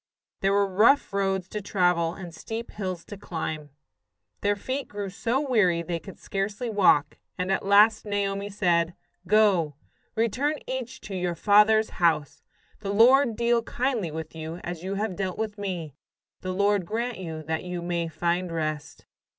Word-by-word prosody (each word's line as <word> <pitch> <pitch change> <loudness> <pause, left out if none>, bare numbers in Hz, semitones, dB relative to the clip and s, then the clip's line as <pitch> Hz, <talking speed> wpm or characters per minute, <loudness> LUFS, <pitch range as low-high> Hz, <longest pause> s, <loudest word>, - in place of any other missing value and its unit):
There 195 - +2
were 200 0 +3
rough 215 +7 +3
roads 195 -2 0
to 210 - -4
travel 180 -4 +1
and 175 -4 -8
steep 225 +7 -6
hills 185 -4 -5
to 205 - -9
climb. 155 -5 -5 0.7
Their 205 0 +2
feet 260 +6 -4
grew 205 -2 -5
so 235 +6 0
weary 210 - +2
they 170 0 -3
could 195 +2 -11
scarcely 200 +4 -3
walk, 175 -8 +3 0.2
and 180 +1 -1
at 195 - 0
last 210 +2 +6
Naomi 200 -1 -2
said: 175 -4 +1 0.3
"Go, 195 -8 +3 0.4
return 255 +7 +1
each 260 -1 -5
to 200 - -8
your 180 -1 -1
father's 210 +4 +4
house. 160 -4 +2 0.4
The 200 -2 -3
Lord 240 +3 +5
deal 235 +1 +2
kindly 240 -5 -1
with 160 0 -6
you 160 0 -6
as 175 -2 -5
you 195 +1 -3
have 205 -2 -2
dealt 190 -2 -3
with 215 -2 -3
me. 175 -7 -4 0.5
The 185 - -4
Lord 200 +1 +2
grant 235 +2 -2
you 160 -3 -6
that 160 +1 -2
you 180 -1 -5
may 170 -1 -1
find 170 +3 -1
rest." 155 -2 -4
195 Hz, 165 wpm, -26 LUFS, 170-215 Hz, 0.7 s, last